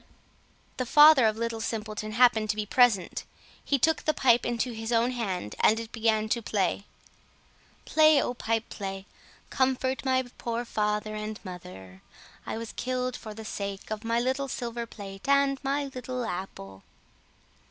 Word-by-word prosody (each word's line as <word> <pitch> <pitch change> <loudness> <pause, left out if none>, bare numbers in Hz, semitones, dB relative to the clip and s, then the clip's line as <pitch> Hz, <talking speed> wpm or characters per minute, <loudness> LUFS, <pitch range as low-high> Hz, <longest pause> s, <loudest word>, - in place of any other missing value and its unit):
The 255 - -2
father 295 -4 +8
of 215 0 0
Little 230 0 -3
Simpleton 215 -1 -4
happened 225 -2 +4
to 210 - +1
be 215 -1 -2
present. 215 -5 +2 0.4
He 280 - +1
took 320 +5 +2
the 310 - 0
pipe 245 -2 +3
into 240 +1 -1
his 225 0 -5
own 235 +1 +2
hand, 190 - -3
and 220 - +4
it 230 0 -7
began 220 -2 +1
to 235 - 0
play: 200 -2 -1 1.0
"Play, 310 -1 +5
oh 245 - -1
pipe, 225 -2 -2
play! 195 -1 -6 0.5
Comfort 260 0 0
my 260 -1 +2 0.2
poor 235 0 -3
father 210 -1 -1
and 215 0 -5
mother. 95 - -10 0.5
I - - -3
was 230 0 -6
killed 255 0 -2
for 215 -1 -8
the 220 0 -9
sake 200 -1 -5
of 215 +1 -4
my 230 +1 +1
little 265 +3 -1
silver 235 -2 -4
plate 195 +1 -9
and 280 -1 +3
my 280 +1 0
little 255 -2 -5
apple." 100 - -6
230 Hz, 160 wpm, -28 LUFS, 210-255 Hz, 1.0 s, father